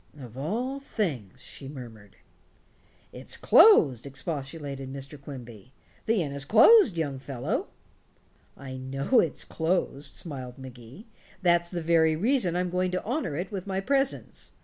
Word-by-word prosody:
"Of 120 -4 -10
all 235 - -3
things," 155 - -4
she 135 - -9
murmured. 115 -7 -11 1.0
"It's - - -6
closed," 140 - +6
expostulated 140 -1 -5
Mr. 140 +1 -8
Quimby; 125 -4 -10 0.3
"the 220 -5 +2
inn 145 - -5
is 140 0 -3
closed, 225 - +6
young 145 -5 -2
fellow." 130 -2 -3 0.9
"I 130 -1 -8
know 135 - +1
it's 165 - -1
closed," 160 -4 -2
smiled 130 -6 -6
Magee. 130 - -12 0.4
"That's 170 -1 +3
the 175 -2 -4
very 160 -1 +3
reason 205 - +1
I'm 180 0 -1
going 180 0 0
to 180 0 -2
honor 240 - -2
it 175 +7 -4
with 195 -1 -5
my 190 -1 -1
presence. 270 +6 -2
150 Hz, 140 wpm, -27 LUFS, 135-185 Hz, 1.0 s, closed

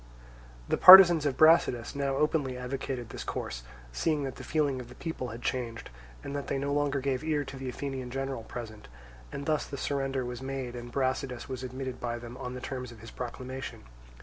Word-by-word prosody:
The - - +1
partisans 175 -4 +10
of 135 - -2
Brasidas 155 -7 +4
now 140 -1 -1
openly 145 -3 0
advocated 125 -1 -4
this - - -6
course, - - -4 0.3
seeing 150 - 0
that 135 -2 -5
the - - -8
feeling 145 -4 0
of 120 -1 -9
the 125 - -12
people 160 -5 -5
had 115 +1 -8
changed, 120 -3 -3 0.3
and 140 - -5
that 140 - -4
they - - -1
no 140 +1 -1
longer 145 -1 +1
gave 130 0 -1
ear 155 -2 0
to 135 - -8
the 130 -1 -5
Athenian 130 -1 -5
general 135 -1 -3
present; 110 -2 -8 0.4
and 140 - -6
thus 155 0 0
the 140 - -6
surrender 135 -2 -2
was 125 0 -6
made 130 -2 -4
and 120 0 -8
Brasidas 130 -1 -2
was 130 -2 -5
admitted 130 0 -5
by 120 -1 -3
them 120 0 -9
on 125 0 -6
the 125 - -7
terms 125 -2 -5
of 115 - -13
his 115 - -10
proclamation. 130 +2 -6
130 Hz, 200 wpm, -29 LUFS, 125-140 Hz, 0.4 s, partisans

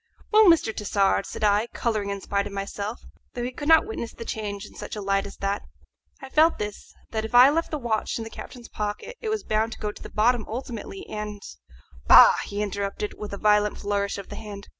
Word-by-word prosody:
"Well, 435 0 +7
Mr. 325 -10 +4
Tassard," 200 -1 +1
said - - -6
I, 210 +2 +3
colouring 215 -4 -1
in 200 -1 -4
spite 200 +1 -1
of 200 - -9
myself, 200 +2 -5 0.3
though 240 - -3
he 250 - -3
could 290 +3 -6
not 320 0 +6
witness 405 - -5
the 230 - -9
change 205 -2 -4
in - - -14
such - - -7
a - - -5
light 195 0 0
as 200 - -11
that, 200 +1 -1 0.6
"I - - -6
felt 315 +4 +4
this, 210 -1 -6 0.2
that 220 -1 -2
if 220 +2 -4
I 255 +3 +9
left 330 +2 0
the 305 - -2
watch 235 -5 -1
in 230 - -4
the 225 - -9
captain's 240 -2 -10
pocket 210 - -5
it 445 - -3
was 435 -1 -1
bound 220 +1 0
to - - -12
go 210 -1 -2
to - - -15
the - - -8
bottom 230 +2 +2
ultimately, 245 - -6
and 210 -1 -5 0.4
" 65 0 -24
"Bah!" - - +10
he 205 +1 -3
interrupted, 200 0 -3
with 210 - -6
a 200 - -5
violent 210 0 +3
flourish 200 0 -1
of 200 - -8
the - - -7
hand. 205 -2 -9
210 Hz, 230 wpm, -25 LUFS, 200-240 Hz, 0.6 s, Bah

